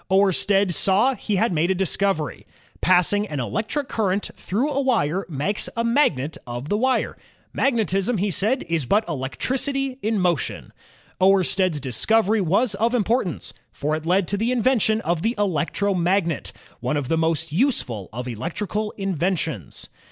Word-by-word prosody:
Oersted 195 0 +3
saw 205 +10 +3
he 215 -4 -3
had 215 0 +1
made 165 +2 +1
a 190 - +2
discovery. 190 -5 -1 0.3
Passing 185 +3 +3
an 150 -6 -4
electric 220 - -2
current 200 -2 -1
through 245 +10 -1
a 280 0 0
wire 200 - 0
makes 165 +8 -1
a 230 - +1
magnet 205 - +1
of 120 +4 -6
the 205 - +1
wire. 260 +3 +1 0.4
"Magnetism," 225 -4 +1
he 200 +2 0
said, 220 - +1
"is 165 -6 -1
but 210 - +3
electnaty 255 - -2
in 220 +1 0
motion." 175 - -1 0.5
Oersted's 185 -3 +3
discovery 210 - +2
was 200 +6 +2
of 230 +5 +1
importance, 220 - -1 0.2
for 150 +2 -2
it 155 +1 -6
led 180 +1 +2
to 200 - 0
the 225 +4 0
invention 230 -3 +2
of 170 -4 -1
the 230 +5 0
electromagnet, 185 -2 0 0.3
one 125 +5 -1
of 140 -3 -2
the 165 - +1
most 160 -2 0
useful 155 - 0
of 125 +3 -5
electrical 205 - -3
inventions. 175 - -2
195 Hz, 150 wpm, -23 LUFS, 160-220 Hz, 0.5 s, Oersted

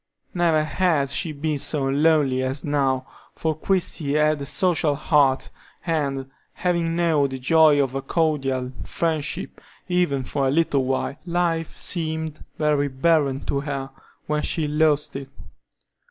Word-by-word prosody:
Never 165 -3 +2
had 155 -4 +1
she 160 +3 0
been 150 0 -2
so 140 -1 0
lonely 140 -2 +3
as 130 +2 -2
now, 135 -3 0 0.3
for 160 -1 -1
Christie 165 -4 -1
had 150 -1 +2
a 140 - -3
social 160 -3 +2
heart, 140 -2 +2 0.3
and, 140 -5 -1 0.3
having 170 -2 0
known 160 -5 +2
the 130 - -5
joy 155 +2 +4
of 135 -2 +1
a 135 - -2
cordial 135 -4 0
friendship 165 +1 -3 0.3
even 175 -7 +1
for 135 +2 -1
a - - +2
little 140 -2 +2
while, 135 +1 -1
life 170 -2 -1
seemed 160 -2 -2
very 150 -2 +2
barren 140 0 +1
to 140 - -2
her 140 -2 -4 0.3
when 150 0 -1
she 155 -1 -1
lost 150 -1 +1
it. 135 -1 -6
150 Hz, 140 wpm, -23 LUFS, 135-165 Hz, 0.3 s, joy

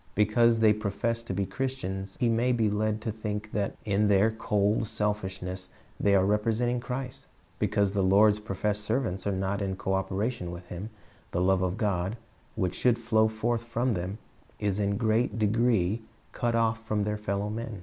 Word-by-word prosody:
Because 115 +2 +4
they 110 -1 +6
profess 110 +3 -2
to 115 - -6
be 100 +1 0
Christians 95 -7 -4
he 120 - +2
may 115 +2 +2
be 110 -3 +2
led 110 +1 0
to 110 - -2
think 105 0 -4
that 100 -2 -1
in 105 0 +2
their 100 +2 +4
cold 105 0 +1
selfishness 95 -3 -3 0.3
they 100 -1 +4
are 95 -1 +4
representing 115 +4 +1
Christ. 130 +2 -5 0.3
Because 100 -1 +2
the 100 0 0
Lord's 105 +3 +5
professed 105 0 -2
servants 110 -4 -1
are - - +2
not 95 +1 -1
in 95 -1 -1
co 95 0 -2
operation 95 +1 -1
with 85 +1 -8
Him, 90 +5 -6 0.4
the 85 - -2
love 95 0 +3
of 95 +2 -1
God, 100 -1 -1 0.4
which 95 -4 0
should 120 +4 +2
flow 110 -1 +3
forth 110 +2 -1
from 120 +1 -1
them, 90 +2 -3 0.4
is 100 -1 -1
in 100 0 +1
great 110 -1 +1
degree 110 -2 +2 0.3
cut 120 -1 -1
off 115 0 +1
from 105 -2 0
their 105 +1 -1
fellow 100 -1 -2
m.en. 110 0 -5
105 Hz, 180 wpm, -28 LUFS, 100-115 Hz, 0.4 s, they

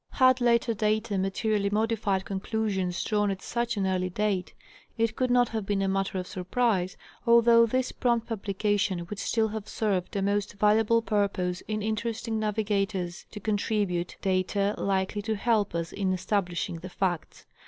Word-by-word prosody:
Had 255 -1 +4
later 235 0 +3
data 215 -1 0
materially 200 +2 0
modified 210 -2 0
conclusions 195 -2 -2
drawn 210 -1 +1
at 195 -1 -4
such 235 -1 -2
an 195 - +1
early 185 -1 0
date, 195 -1 -1 0.5
it 225 -1 +1
could 255 -1 0
not 245 -1 +4
have 220 -2 -3
been 195 0 0
a - - +1
matter 195 0 -1
of 180 - -3
surprise, 185 0 0 0.3
although 235 0 +6
this 255 +2 0
prompt 235 -2 +1
publication 200 -4 -1
would 205 - -4
still 220 -1 +1
have 215 -1 -5
served 200 -5 -1
a 200 - 0
most 200 0 0
valuable 215 +3 +3
purpose 200 -4 0
in 215 -1 -2
interesting 220 +1 -2
navigators 200 -4 -1
to 210 - -8
contribute 205 -4 -1
data 195 +1 +1
likely 195 +1 0
to 220 +1 -1
help 210 -3 +1
us 170 -1 -2
in 190 -2 0
establishing 180 -3 -1
the 185 +3 -8
facts. 175 -2 -3
205 Hz, 160 wpm, -28 LUFS, 190-220 Hz, 0.5 s, although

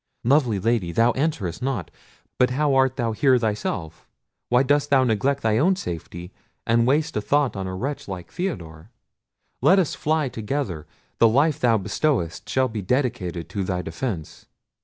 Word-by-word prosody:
Lovely 125 -5 +3
Lady, 110 -4 0
thou 115 +6 +3
answerest 125 - -2
not. 125 - -3 0.5
But 125 - +4
how 145 +2 +1
art 130 -1 +3
thou 115 -3 -1
here 130 +3 +3
thyself? 105 -7 -3 0.4
Why 125 +2 +4
dost 145 +1 +1
thou 135 -2 +4
neglect 130 +4 0
thy 110 0 +2
own 185 +6 +3
safety, 85 - -7 0.3
and 115 +1 +3
waste 150 +4 +1
a 105 - 0
thought 140 +4 +1
on 95 -1 -4
a 95 - -4
wretch 135 +9 -4
like 90 -3 -7
Theodore? 90 - -5 0.7
Let 160 +9 +5
us 185 -6 +1
fly 155 -1 0
together: 110 - -4 0.3
the 115 - +7
life 145 +6 +2
thou 120 -4 +3
bestowest 105 - -1
shall 130 +3 +2
be 110 -3 -5
dedicated 90 - -1
to 100 - -3
thy 90 -1 -2
defence." 85 - -5
120 Hz, 165 wpm, -23 LUFS, 95-140 Hz, 0.7 s, the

